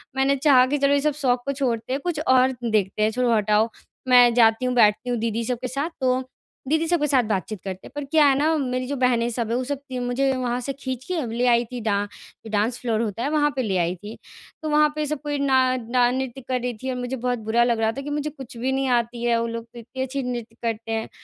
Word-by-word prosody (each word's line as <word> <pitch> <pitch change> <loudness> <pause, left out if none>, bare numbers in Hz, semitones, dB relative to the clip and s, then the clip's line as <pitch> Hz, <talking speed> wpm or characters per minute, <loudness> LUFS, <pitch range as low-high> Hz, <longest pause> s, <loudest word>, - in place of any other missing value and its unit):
मैंने 270 +1 +2
चाहा 265 -2 +5
कि - - +3
चलो 280 0 +3
ये 285 - +3
सब 300 +1 +1
शौक 245 -2 +2
को 280 - 0
छोड़ते 255 -4 -2
हैं 275 - -1
कुछ 345 -4 -2
और 260 0 +5
देखते 215 -3 0
हैं 215 - +3
छोड़ो 245 0 +1
हटाओ। 215 +1 +2 0.4
मैं 245 -1 +7
जाती 230 +1 +4
हूँ 250 0 0
बैठती 220 +1 +3
हूँ 245 - 0
दीदी 230 0 -1
सब 250 +1 -1
के 255 - -2
साथ, 275 +6 -2
तो 255 0 +1 0.4
दीदी 315 +3 +1
सबके 330 -3 +1
साथ 265 -4 +3
बातचीत 210 -1 -3
करते 190 -1 -6
हैं - - -15
पर 290 - -3
क्या 305 +1 +4
है 275 -1 +4
ना 315 +2 +2
मेरी 255 -2 -2
जो 285 - -2
बहनें 240 -2 +2
सब 230 -1 -3
है 235 - 0
वो 255 - 0
सब 275 +1 -3 0.2
मुझे 250 +2 +1
वहाँ 245 -1 -1
से 275 +2 -4
खींच 260 -2 -4
के 360 -3 -2
ले 240 +2 0
आई 240 0 +4
थी 245 -2 -5
डां 205 -2 0 0.5
डांस 220 +3 0
फ़्लोर 230 -3 0
होता 225 +1 -3
है 285 - 0
वहाँ 295 -1 +3
पे 260 - 0
ले 195 -4 0
आई 175 0 +1
थी। 210 +5 -10 0.4
तो 310 - -3
वहाँ 300 0 +4
पे 305 0 -1
सब 300 -1 -3
कोई 290 -1 -2
ना 260 -2 +3
ना 245 +1 +2
नृत्य 265 0 -3
कर 255 -1 0
रही 245 -1 -2
थी 260 - -2
और 255 - -2
मुझे 250 +1 -3
बहुत 245 -1 -2
बुरा 220 +2 +2
लग 235 -2 +1
रहा 220 0 +2
था - - -3
कि 285 - -6
मुझे 295 +1 -2
कुछ 265 -5 -11
भी 255 +3 -1
नहीं 270 0 0
आती 240 -1 0
है 235 -1 +2
वो 230 - -1
लोग 230 0 -5
तो 235 +1 -13
इतनी 255 +3 -7
अच्छी 265 +1 -3
नृत्य 240 -2 -5
करते 225 -1 -3
हैं। 225 0 -2
250 Hz, 265 wpm, -23 LUFS, 230-270 Hz, 0.5 s, मैं